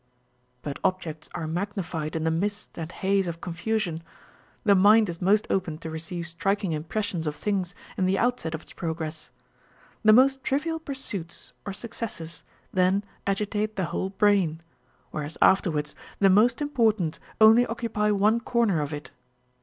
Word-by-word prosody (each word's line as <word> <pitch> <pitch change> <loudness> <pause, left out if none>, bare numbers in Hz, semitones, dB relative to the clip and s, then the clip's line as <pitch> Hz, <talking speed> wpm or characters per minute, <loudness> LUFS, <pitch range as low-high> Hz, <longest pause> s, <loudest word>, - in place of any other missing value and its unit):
But 145 -2 -5
objects 170 -5 -2
are 170 -2 -3
magnified 170 -2 -3
in 160 - -1
the 160 - +2
mist 205 +5 -2
and 165 0 -5
haze 195 0 +1
of 165 -1 -4
confusion; 175 -1 -2 0.6
the 205 - +5
mind 205 +2 +6
is 170 +1 -6
most 205 +4 +3
open 175 -5 0
to 160 0 -7
receive 165 +2 -5
striking 195 +3 -1
impressions 165 +2 -2
of 150 - -2
things 190 0 -2 0.2
in 185 - +2
the 190 +1 +2
outset 240 -10 0
of 160 - -8
its - - -15
pro 165 -2 -3
gress. 160 -1 -6 0.7
The 215 - +6
most 265 +4 +5
trivial 320 +4 0
pursuits 245 - -7
or 200 - -3
successes 185 -7 -7 0.3
then 185 +2 +3 0.2
agitate 210 +2 -1
the 190 - 0
whole 190 - -1
brain; 190 -5 +2 0.5
whereas 155 +1 -5
afterwards 155 -6 +3 0.2
the 195 -1 +5
most 230 +7 +4
important 220 - +1 0.2
only 225 +3 +7
occupy 225 -2 -1
one 210 +3 +3
corner 235 -8 +1
of 145 0 -3
it. 150 0 -7
190 Hz, 155 wpm, -26 LUFS, 165-215 Hz, 0.7 s, only